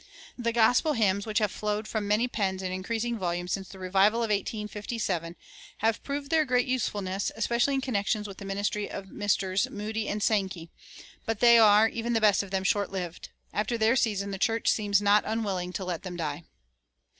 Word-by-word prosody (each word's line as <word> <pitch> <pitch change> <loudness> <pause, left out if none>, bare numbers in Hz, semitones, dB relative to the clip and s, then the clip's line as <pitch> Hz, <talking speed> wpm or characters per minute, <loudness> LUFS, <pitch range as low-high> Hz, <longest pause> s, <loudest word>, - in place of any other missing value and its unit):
The 235 -2 -1
"gospel 245 +7 +3
hymns" 200 -4 +1
which 215 -1 -1
have 210 -3 +2
flowed 210 0 -3
from 215 -2 -2
many 215 +4 +2
pens 190 -5 -2
in 185 - -2
increasing 225 +5 -2
volume 175 -1 -2
since 190 +1 -3
the 195 - -11
revival 195 +5 +2
of 220 - -1
1857 210 -4 -3 0.4
have 225 0 0
proved 280 +1 -4
their 320 -1 +4
great 250 -3 +1
usefulness, 205 -6 -1
especially 235 +4 +1
in 270 - 0
connection 215 -4 -1
with 200 -2 -9
the 200 - -8
ministry 205 +1 -2
of 195 -1 -7
Messrs. 195 -2 0
Moody 215 +1 -4
and 210 0 -2
Sankey; 190 -7 -1 0.6
but 225 -2 -1
they 235 -1 +7
are, 215 0 +7
even 235 +1 -3
the 225 - +3
best 210 -3 +4
of 200 - -8
them, 190 0 -1
short 200 +1 +1
lived. 180 -3 -5 0.2
After 215 +3 -1
their 225 +2 +3
season 200 -5 0
the 195 - -5
church 225 +3 +1
seems 205 -1 +2
not 205 +1 +4
unwilling 200 -5 -2
to 190 - -4
let 175 -3 -3
them 180 -2 -7
die. 155 -1 -4
210 Hz, 190 wpm, -28 LUFS, 190-225 Hz, 0.6 s, they